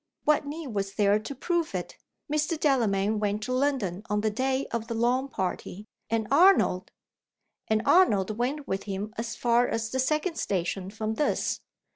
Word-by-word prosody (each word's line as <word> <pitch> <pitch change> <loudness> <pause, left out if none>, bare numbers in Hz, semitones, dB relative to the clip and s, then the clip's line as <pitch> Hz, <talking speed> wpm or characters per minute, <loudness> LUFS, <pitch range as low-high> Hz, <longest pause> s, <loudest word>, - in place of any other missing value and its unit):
"What 300 -1 +2
need 300 0 -5
was 195 -1 -2
there 205 0 +3
to 220 +6 -7
prove 340 +4 -1
it? - - -4 0.3
Mr. 305 +2 0
Delamayn 215 -8 +2
went 210 0 -1
to 255 - -2
London 255 -9 0
on 210 0 +1
the 215 0 +1
day 260 +4 0
of 230 -1 -3
the 230 - -3
lawn 245 +4 +1
party. 190 -1 -4 0.2
And 225 -2 0
Arnold 285 - +4 0.4
" - - -56
"And 220 0 +2
Arnold 215 - +4
went 275 +5 -2
with 195 +1 -2
him 205 +1 -4
as 230 -1 -4
far 240 +1 +3
as 225 -1 -2
the 260 - -1
second 305 +6 0
station 185 0 -2
from 215 +1 -3
this. 295 +7 0
230 Hz, 175 wpm, -27 LUFS, 205-275 Hz, 0.4 s, Arnold